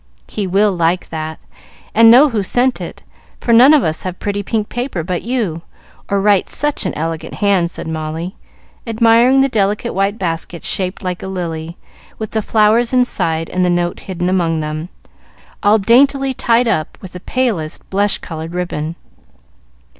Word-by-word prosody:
"He 205 -2 -3
will 200 +2 +2
like 170 +1 0
that, 160 -1 -5 0.5
and 225 +1 +7
know 265 +6 +7
who 225 -5 -1
sent 245 +6 0
it, - - -8 0.4
for 235 - +1
none 250 +5 +8
of 300 -4 +5
us 160 0 -1
have 185 -1 -5
pretty 205 0 -3
pink 210 +1 -2
paper 240 -9 -3
but 180 0 -3
you, 220 -10 -2 0.5
or 200 0 +1
write 200 -1 +2
such 295 0 -1
an - - -3
elegant 160 +1 -4
hand," 195 -4 +2
said 170 - -7
Molly, 160 +3 -4 0.5
admiring 230 +3 +4
the 270 - +4
delicate 210 -1 0
white 195 +2 0
basket 170 -2 -4
shaped 185 +1 -3
like 180 -1 -3
a - - -6
lily, 170 -3 -5 0.4
with 220 -1 -5
the 220 - 0
flowers 220 +3 +2
inside 165 -10 +1
and 185 - 0
the 180 - +2
note 175 0 0
hidden 180 -2 -4
among 170 -3 +1
them, 155 +2 -4 0.7
all 205 +2 +4
daintily 270 +5 +3
tied 240 0 +2
up 155 -9 -1
with 190 - -10
the 180 - -8
palest 205 -9 -2
blush 200 +1 +1
colored 165 +1 -7
ribbon. 170 -3 -3
195 Hz, 170 wpm, -17 LUFS, 170-230 Hz, 0.7 s, none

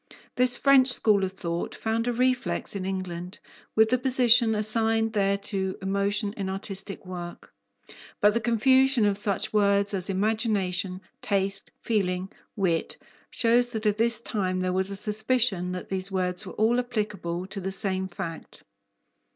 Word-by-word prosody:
This 250 0 +6
French 275 -2 +5
school 210 -5 +3
of 190 - -1
thought 170 -3 -4
found 225 +1 -2
a - - +1
reflex 255 -2 0
in 190 -1 -4
England 185 -1 -5 0.4
with 220 0 +4
the 255 - +2
position 245 -3 +4
assigned 225 +1 0
there 200 -1 +1
to 195 -2 -3
emotion 200 +2 -1
in 195 -2 -4
artistic 195 0 -3
work. 175 -1 -9 0.7
But 205 0 +4
the 230 - +1
confusion 260 +2 +3
of 205 -1 +2
such 205 +1 -1
words 200 -1 +3
as 190 0 +1
imagination, 195 -2 -1 0.2
taste, 195 -1 -2
feeling, 190 -4 -1 0.2
wit, 175 -5 -1 0.3
shows 240 +1 +2
that 220 -1 -4
at 210 -1 +1
this 230 0 +2
time 185 -5 -2
there 185 0 -1
was 190 +1 -1
a 200 - -5
suspicion 210 -3 +1
that 180 - -7
these 190 0 -3
words 185 +1 -1
were - - -8
all 230 +3 +2
applicable 210 -8 -3
to 195 +1 -7
the 190 +1 -4
same 190 -1 -1
fact. 165 -2 -8
200 Hz, 155 wpm, -26 LUFS, 190-225 Hz, 0.7 s, This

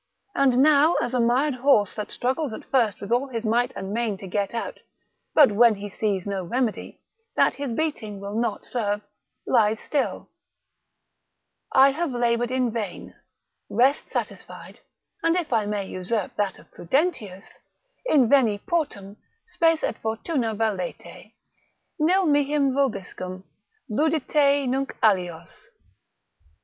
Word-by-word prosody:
And 265 -3 +3
now 305 +2 +5
as 240 +1 -1
a 250 - +1
mired 250 +5 +2
horse 250 -6 +3
that 210 - -5
struggles 260 +1 -2
at - - -8
first 230 -7 +2
with 200 - -7
all 245 +4 +2
his 235 -3 -5
might 240 +3 +1
and 195 +1 -5
main 225 -3 -1
to 195 - -10
get 200 +1 -2
out, 230 - -4 0.6
but 290 -7 +7
when 225 +1 +5
he 205 +1 -7
sees 200 -2 -2
no 200 -2 -3
remedy, 235 +4 -3 0.3
that - - +3
his 280 -3 -3
beating 230 -7 -3
will 200 +1 -6
not 225 -1 -2
serve, 210 -4 -2 0.4
lies 220 -3 +2
still, 285 -3 -2 1.4
I 270 +1 +6
have 315 -1 -2
laboured 240 0 +1
in 255 -2 0
vain, 215 -5 -5 0.6
rest 265 +4 +2
satisfied, - - -6 0.4
and 330 -1 +2
if 335 -7 -1
I 215 -3 +1
may 205 -1 -2
usurp 190 +3 -3
that 205 -2 -1
of - - -19
Prudentius, 215 - -2 0.5
Inveni 245 -6 +4
portum; 210 - -2 0.3
spes 330 -7 +1
et - - -2
fortuna 225 +1 -2
valete, 205 -5 -4 0.6
Nil 365 +5 +3
mihi 290 -1 +2
vobiscum, 215 -9 -1 0.4
ludite 285 +1 +2
nunc 270 +2 -2
alios. 175 -6 0
235 Hz, 135 wpm, -24 LUFS, 205-280 Hz, 1.4 s, but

